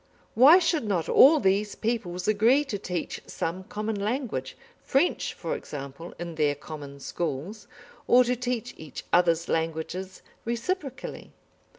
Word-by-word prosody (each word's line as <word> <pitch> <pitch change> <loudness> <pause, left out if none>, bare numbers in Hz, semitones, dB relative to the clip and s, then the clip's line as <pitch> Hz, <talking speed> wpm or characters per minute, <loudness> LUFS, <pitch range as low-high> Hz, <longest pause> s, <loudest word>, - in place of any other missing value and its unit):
Why 275 +9 +8
should 330 -7 +1
not 180 -6 0
all 305 +3 +7
these 200 0 +1
peoples 185 -6 -2
agree 230 +7 +4
to 210 -8 -4
teach 180 -3 -4
some 185 +3 -4
common 210 +1 -3
language, 210 - -3 0.2
French, 280 +7 +1
for - - -3
example, 145 - -8
in 170 -1 -6
their 150 -2 +1
common 145 -1 -9
schools, 165 +8 -4 0.4
or 250 +1 +7
to 250 +1 0
teach 245 0 -3
each 155 -5 -8
other's 170 -1 +3
languages 165 +3 -3 0.2
reciprocally? 265 +3 -4
200 Hz, 130 wpm, -27 LUFS, 165-250 Hz, 0.4 s, Why